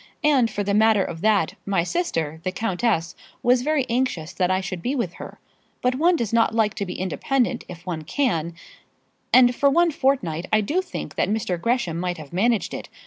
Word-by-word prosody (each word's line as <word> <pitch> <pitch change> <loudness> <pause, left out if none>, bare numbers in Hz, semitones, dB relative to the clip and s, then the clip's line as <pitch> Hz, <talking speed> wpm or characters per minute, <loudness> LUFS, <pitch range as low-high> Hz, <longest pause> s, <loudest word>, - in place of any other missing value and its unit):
And, 275 -6 +4
for 205 -1 -3
the 200 0 -1
matter 215 -1 +4
of 165 -2 -6
that, 215 -2 +2
my 195 -4 0
sister, 165 - -2
the 185 - -1
countess, 190 -4 -1 0.3
was 245 0 +4
very 295 -1 +1
anxious 230 -9 -1
that 180 -1 0
I 185 0 +2
should 185 -2 -5
be 255 +9 -1
with 200 -10 -2
her. - - -9 0.4
But 250 0 +1
one 335 +7 +3
does 230 -8 -2
like 225 -2 +2
to 200 -3 -4
be 180 - -5
independent 245 +6 -1
if 175 -1 -11
one 170 -4 -3
can, 170 - -1 0.8
and 250 -1 +6
for 280 - +3
one 340 +4 +3
fortnight 220 - 0
I 215 0 +4
do 310 - 0
think 365 - -7
that - - +1
Mr. 190 -5 -1
Gresham 230 -9 0
might 180 0 -2
have 155 -1 -11
managed 220 +4 +1
it. - - -7
215 Hz, 195 wpm, -23 LUFS, 180-255 Hz, 0.8 s, and